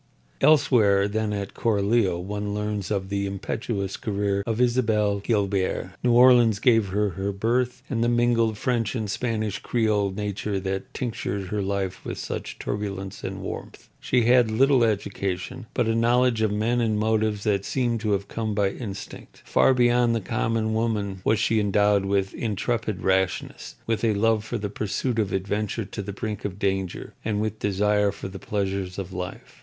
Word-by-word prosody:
Elsewhere 105 -10 +4
than 110 +1 -1
at 100 -1 -4
Coralio 105 -4 +1
one 105 +2 -4
learns 105 -2 -2
of 95 -2 -2
the 100 0 -1
impetuous 100 0 -3
career 100 -1 -1
of 115 0 -1
Isabel 110 -5 +2
Guilbert. 100 -3 0
New 120 -1 +3
Orleans 120 -3 +6
gave 115 -2 +3
her 100 0 -1
birth 125 +5 -1
and 115 -3 -1
the 120 - +2
mingled 120 -2 +2
French 115 -1 0
and 110 -3 -2
Spanish 110 -4 -2
creole 105 -4 +1
nature 100 0 -3
that 95 0 -4
tinctured 100 -6 -3
her 105 0 -1
life 95 -1 -2
with - - -5
such - - -5
turbulence 100 -2 -4
and - - -5
warmth. - - -7
She 125 -2 +1
had 120 0 +5
little 130 +3 +4
education, 100 +1 -2
but - - +2
a 115 - +1
knowledge 120 0 +3
of 110 -2 +2
men 115 +4 +1
and 110 -2 +1
motives 110 -1 +1
that 100 -2 +1
seemed 120 -2 0
to 105 -2 +1
have 100 0 -1
come 110 0 -3
by 100 -2 +2
instinct. 100 -5 -8
Far 130 - +4
beyond 120 -1 +3
the - - +1
common 110 +1 -1
woman 105 -4 -1
was 110 - +3
she 110 0 +2
endowed 105 -1 +3
with 95 -1 0
intrepid 110 -2 -2
rashness, 95 -1 -1
with 115 0 -1
a 110 -2 +2
love 110 +1 +2
for 120 +2 -3
the 105 -2 -3
pursuit 110 +4 -2
of 105 -3 0
adventure 105 +3 -2
to 100 - -6
the 100 +1 -5
brink 105 +1 -5
of 100 -2 -4
danger, 95 -2 -2
and 105 -2 -1
with 110 0 -2
desire 105 +1 +2
for - - -7
the 95 0 -8
pleasures 95 -3 -2
of 95 -1 -5
life. 90 -1 -7
105 Hz, 170 wpm, -25 LUFS, 100-115 Hz, -, Orleans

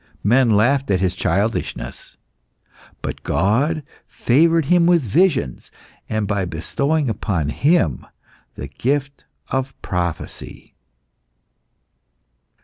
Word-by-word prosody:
Men 120 +4 +4
laughed 130 +6 +2
at 95 -2 +2
his 95 -1 +1
childishness, 105 +3 -2 0.9
but - - -5
God 140 - +1 0.2
favoured 165 +5 +2
him 170 +3 +4
with 175 -4 +4
visions, 130 - +1 0.4
and 110 -2 -1
by 100 -1 0
bestowing 140 - -1
upon 95 -8 -1
him 95 - +1 0.5
the - - -6
gift 140 +2 -2 0.2
of 130 0 -3
prophecy. 85 -3 -5
120 Hz, 95 wpm, -20 LUFS, 95-145 Hz, 0.9 s, Men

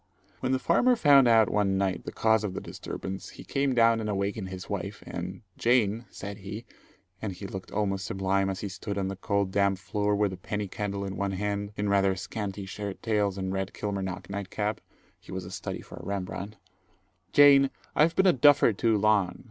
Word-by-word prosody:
When 130 - -1
the 130 - +3
farmer 240 - +3
found 140 - +6
out 115 -2 +6
one 100 -2 +1
night 95 -1 -1
the - - -5
cause 110 -1 +2
of 95 -3 -3
the - - -2
disturbance, 95 0 -6
he - - -11
came 135 -2 0
down 115 -1 +5
and 110 -1 -3
awakened 100 0 -2
his 95 -1 -7
wife - - -5
and 90 +4 -6 0.2
"Jane," 115 -2 +2
said 100 +1 -7
he, 105 +4 -7 0.6
and 105 -3 -3
he 100 - -9
looked 95 -1 -7
almost 100 -2 -1
sublime 95 0 0
as 95 - -4
he 105 - -3
stood 100 +1 -5
on 95 -1 -1
the 95 - -4
cold 100 0 -1
damp 100 0 +2
floor 105 +2 -1
with 100 -2 +1
a - - -7
penny 105 +2 -3
candle 100 0 -3
in 95 -1 -5
one 100 +1 -1
hand, 100 +1 -2
in 105 - -1
rather 100 -1 +3
scanty 100 0 -5
shirt 100 0 -6
tails 105 -4 +1
and 95 0 -2
red 95 0 -3
Kilmarnock 95 -3 -4
night 100 -1 -5
cap 105 +1 -2 0.4
he - - -14
was 95 -1 -4
a 90 - -9
study - - -5
for - - -12
a - - -9
Rembrandt, 100 +1 -4 0.8
"Jane, 140 -1 +7 0.3
I've 160 +2 +4
been 190 - +4
a 185 - +6
duffer 135 -3 +5
too 110 +2 +2
long. 100 -3 +2
100 Hz, 205 wpm, -28 LUFS, 95-110 Hz, 0.8 s, Jane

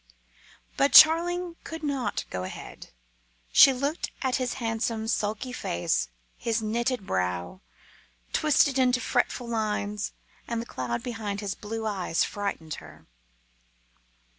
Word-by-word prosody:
But 280 - +3
Charling 340 +2 +6
could 320 -1 -7
not 270 -8 -2
go 90 - -3
ahead. 95 - -9 0.6
She 275 - +9
looked 280 +5 -2
at 260 -2 +1
his 255 -2 -2
handsome, 225 -2 -2
sulky 220 +3 -2
face, 65 - -1 0.3
his 230 -1 0
knitted 230 0 -1
brow, 90 - -2 0.7
twisted 285 -3 +3
into 250 -1 +3
fretful 245 -1 0
lines, 210 -2 -2 0.3
and 235 -1 -2
the 230 - -4
cloud 125 - -4
behind 215 -4 -4
his 200 -2 -3
blue 220 +1 -5
eyes 190 -6 0
frightened 200 -6 -4
her. - - -15
225 Hz, 120 wpm, -27 LUFS, 205-260 Hz, 0.7 s, She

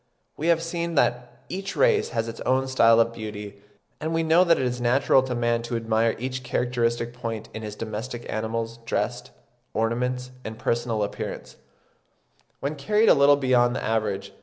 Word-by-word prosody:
We 155 - -3
have 165 -1 +3
seen 170 0 -3
that 125 -3 0
each 195 +2 -5
race 475 -4 +3
has 115 0 -2
its 115 0 -7
own 130 +1 +1
style 115 -3 +5
of 115 0 +3
beauty, 105 -2 -7 0.4
and 160 +1 -3
we 165 - +1
know 165 +3 +5
that 170 -2 +4
it 130 - 0
is 125 0 -2
natural 130 +2 +4
to 130 -1 -3
man 120 0 +1
to 120 +1 -4
admire 115 0 +1
each 130 +2 -4
characteristic 120 -1 -1
point 115 -3 -5
in 110 - -6
his 105 -1 -6
domestic 115 +3 -5
animals, 115 +1 -3
dress, 115 - -1 0.5
ornaments, 125 +3 -1
and 110 0 -6
personal 115 -2 -1
appearance, 100 - -5 1.1
when 140 +2 -1
carried 210 +10 +3
a - - +9
little 140 0 +5
beyond 125 -3 +3
the - - -3
average. 105 -3 -1
120 Hz, 175 wpm, -25 LUFS, 115-135 Hz, 1.1 s, a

